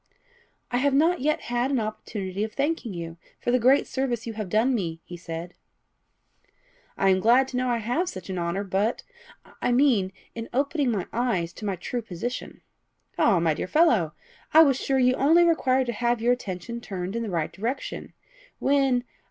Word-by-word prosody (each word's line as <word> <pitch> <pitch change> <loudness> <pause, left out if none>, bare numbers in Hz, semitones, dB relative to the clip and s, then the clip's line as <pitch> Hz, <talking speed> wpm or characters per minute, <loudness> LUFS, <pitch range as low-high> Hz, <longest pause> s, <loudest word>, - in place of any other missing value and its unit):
"I 245 - +1
have 275 +2 +2
not 330 +5 +3
yet 305 +3 +1
had 240 +2 -1
an 270 -3 +1
opportunity 210 -2 -4
of 220 - -4
thanking 280 -5 -1
you 165 -1 -6 0.2
for 240 - -1
the 250 - +3
great 260 +4 +4
service 250 -4 -2
you 230 - -4
have 210 -3 -5
done 225 +7 +2
me," 170 -8 -2
he 175 - -9
said. 170 0 -7 1.4
"I 195 - +3
am 190 0 +4
glad 245 +6 +4
to 250 - -3
know 255 0 0
I 240 - +1
have 245 - -1
such - - -8
an 185 -2 -3
honour; 170 +3 -1
but 200 +4 -1 0.3
" - - -26 0.2
"I - - +1
mean, 240 -7 +3 0.2
in 230 0 -6
opening 280 +1 +1
my 205 -6 -1
eyes 190 -9 0
to 215 - -8
my 195 -2 -1
true 240 +7 -4
position." 230 +4 -6 0.6
"Ah, 185 - +4
my 165 -2 +2
dear 150 - -4
fellow! 225 - +3 0.4
I 320 - +10
was 275 -4 +2
sure 270 - +1
you 255 -1 +4
only 315 +7 +4
required 265 -6 +2
to 240 - -2
have 240 +1 0
your 240 +2 +3
attention 235 +1 -5
turned 190 -2 -5
in 230 - -1
the 225 - -3
right 165 -4 -2
direction. 235 +8 -4 0.4
When 270 -3 +2
235 Hz, 195 wpm, -25 LUFS, 190-265 Hz, 1.4 s, I